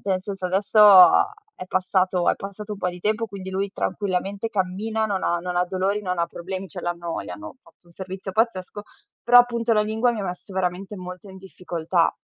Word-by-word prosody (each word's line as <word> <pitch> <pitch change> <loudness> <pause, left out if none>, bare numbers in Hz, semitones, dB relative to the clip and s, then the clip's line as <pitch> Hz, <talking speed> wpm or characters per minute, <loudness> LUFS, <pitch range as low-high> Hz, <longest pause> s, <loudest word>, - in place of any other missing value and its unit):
nel 185 -2 0
senso 195 -3 -4
adesso 195 +4 0 0.8
è - - -7
passato 185 -1 +1
è - - -1
passato 205 +2 -7
un - - -13
po' 180 - -1
di 180 - -11
tempo, 215 +4 0
quindi 195 -3 -8
lui 195 +1 -2
tranquillamente 200 +2 -2
cammina, 215 +3 -1
non 195 -3 -2
ha 175 - +1
non 180 +1 -4
ha 180 - +3
dolori, 190 +3 -1
non 180 -2 -3
ha 170 - +1
problemi, 185 +3 -6
cioè, - - -8
l'hanno 170 -1 -3
gli - - -9
hanno 315 -3 -9
fatto - - -23
un - - -20
servizio 190 +2 -7
pazzesco, 205 -2 -1 0.4
però 245 +1 +8
appunto 235 -1 +2
la 210 - +4
lingua 220 +3 +1
mi 220 - -4
ha 200 - -3
messo 180 +2 -6
veramente 190 +2 -3
molto 180 +1 -9
in 190 - -11
difficoltà. 175 -2 -1
190 Hz, 205 wpm, -23 LUFS, 180-210 Hz, 0.8 s, però